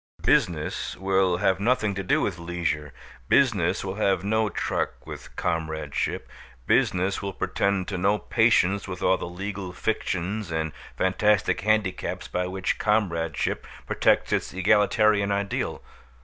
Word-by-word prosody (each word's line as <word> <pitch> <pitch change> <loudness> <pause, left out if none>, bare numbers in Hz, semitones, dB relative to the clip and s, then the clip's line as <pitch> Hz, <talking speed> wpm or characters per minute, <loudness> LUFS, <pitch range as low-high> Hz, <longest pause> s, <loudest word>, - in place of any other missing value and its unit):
Business 80 -4 +1
will 95 -1 +2
have 95 0 +2
nothing 105 -1 +1
to 95 - -3
do 90 - +1
with 90 -3 -2
leisure; 85 -4 -2 0.4
business 110 -11 +3
will 95 +1 -4
have 95 -4 +1
no 110 +1 +1
truck - - -3
with - - -10
comradeship; 80 -3 -2 0.4
business 95 +2 +2
will 100 -1 -4
pretend 100 0 0
to 95 -3 -3
no 100 +3 +3
patience 105 -4 +2
with 90 -1 -6
all 95 - +4
the - - -5
legal 95 +1 -5
fictions 95 0 -2
and 80 -1 -2 0.3
fantastic 95 +2 +2
handicaps 105 -2 0
by 90 0 -2
which 95 0 -2
comradeship 85 -7 0 0.2
protects - - +2
its - - -1
egalitarian 105 +1 +3
ideal. 100 0 -2
95 Hz, 135 wpm, -25 LUFS, 90-105 Hz, 0.4 s, all